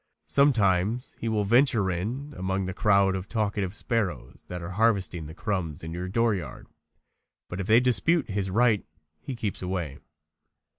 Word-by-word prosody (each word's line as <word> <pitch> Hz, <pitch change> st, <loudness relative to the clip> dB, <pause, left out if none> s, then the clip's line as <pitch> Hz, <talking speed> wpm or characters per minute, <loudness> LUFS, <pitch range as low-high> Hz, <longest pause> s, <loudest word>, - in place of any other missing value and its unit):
Sometimes 115 Hz, -4 st, +2 dB
he 115 Hz, -, -2 dB
will 110 Hz, -2 st, +1 dB
venture 115 Hz, -3 st, +3 dB
in 120 Hz, +12 st, -4 dB
among 95 Hz, +1 st, -1 dB
the 95 Hz, -, -4 dB
crowd 100 Hz, -2 st, +3 dB
of 95 Hz, +1 st, -5 dB
talkative 105 Hz, -4 st, -1 dB
sparrows 105 Hz, -, -2 dB
that 90 Hz, -, -5 dB
are 85 Hz, +2 st, -6 dB
harvesting 95 Hz, -6 st, +1 dB
the 80 Hz, -, -10 dB
crumbs 90 Hz, -9 st, -3 dB
in 80 Hz, -, -5 dB
your 90 Hz, +2 st, -4 dB
dooryard, 105 Hz, -5 st, -1 dB, 0.8 s
but 90 Hz, -, -6 dB
if 95 Hz, -, -5 dB
they 110 Hz, +2 st, +6 dB
dispute 125 Hz, -, +2 dB
his 100 Hz, -2 st, -2 dB
right 110 Hz, +1 st, +3 dB, 0.4 s
he 130 Hz, -, -5 dB
keeps 110 Hz, -4 st, -4 dB
away. 90 Hz, -6 st, -3 dB
100 Hz, 155 wpm, -27 LUFS, 90-115 Hz, 0.8 s, they